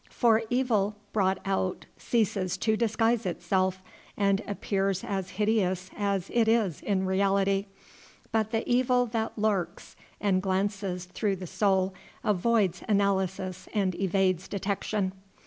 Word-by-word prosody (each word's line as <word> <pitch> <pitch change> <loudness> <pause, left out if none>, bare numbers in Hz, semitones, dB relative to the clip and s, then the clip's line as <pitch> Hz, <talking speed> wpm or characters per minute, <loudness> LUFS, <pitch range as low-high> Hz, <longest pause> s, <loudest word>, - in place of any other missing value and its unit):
For 230 -2 +3
evil 225 -5 +1 0.2
brought 190 -3 +2
out 190 -1 -1
ceases 200 -5 0
to 220 +3 +1
disguise 225 +1 +1
itself, 185 +1 0 0.3
and 200 0 +2
appears 195 -1 -1
as 190 -2 -3
hideous 190 -4 +1
as 200 -3 -1
it 230 -2 +3
is 220 -8 +2
in 190 -2 0
reality; 195 +1 +2 0.6
but 220 -2 +1
the 225 0 -2
evil 250 0 +3
that 225 -1 -3
lurks 205 -4 -1 0.2
and 190 -3 +2
glances 190 -1 -1
through 195 +2 -1
the 185 0 -7
soul 190 0 +1 0.3
avoids 205 -3 +2
analysis 190 -2 0
and 195 -3 +1
evades 190 -1 +1
detection. 200 0 -2
195 Hz, 125 wpm, -28 LUFS, 190-220 Hz, 0.6 s, For